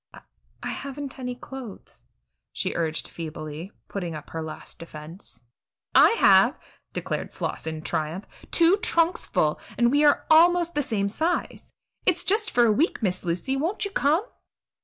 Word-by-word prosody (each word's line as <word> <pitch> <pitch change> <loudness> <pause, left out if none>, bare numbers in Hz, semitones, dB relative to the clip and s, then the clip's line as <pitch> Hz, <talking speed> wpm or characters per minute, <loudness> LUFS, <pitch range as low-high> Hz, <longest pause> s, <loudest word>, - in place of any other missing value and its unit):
"I - - -12 0.4
I - - -3
haven't 275 -1 -6
any 250 -1 -4
clothes," 255 -4 -10 0.5
she - - -2
urged 160 -1 -1
feebly, 155 +2 -7 0.2
putting 175 -5 -4
up 150 -1 -9
her 165 - -4
last 160 -1 -8
defense. 160 - -11 0.5
"I - - +8
have," - - +6 0.3
declared - - -4
Floss - - -4
in 160 -1 -4
triumph 160 +5 -2 0.2
"two 340 +3 +5
trunks 340 -5 +1
full, 150 0 +1 0.2
and 240 0 +4
we 290 +2 +3
are 290 -1 +4
almost 345 +1 +5
the 295 - +1
same 215 -7 -1
size. 320 - -2 0.3
It's 355 -1 +2
just 425 +3 +1
for 240 -1 +4
a 225 - +4
week, 260 - +1
Miss 185 -2 0
Lucy; 180 +10 -1
won't 335 +10 -1
you 400 - -4
come?" 320 +5 +2
245 Hz, 160 wpm, -25 LUFS, -, 0.5 s, I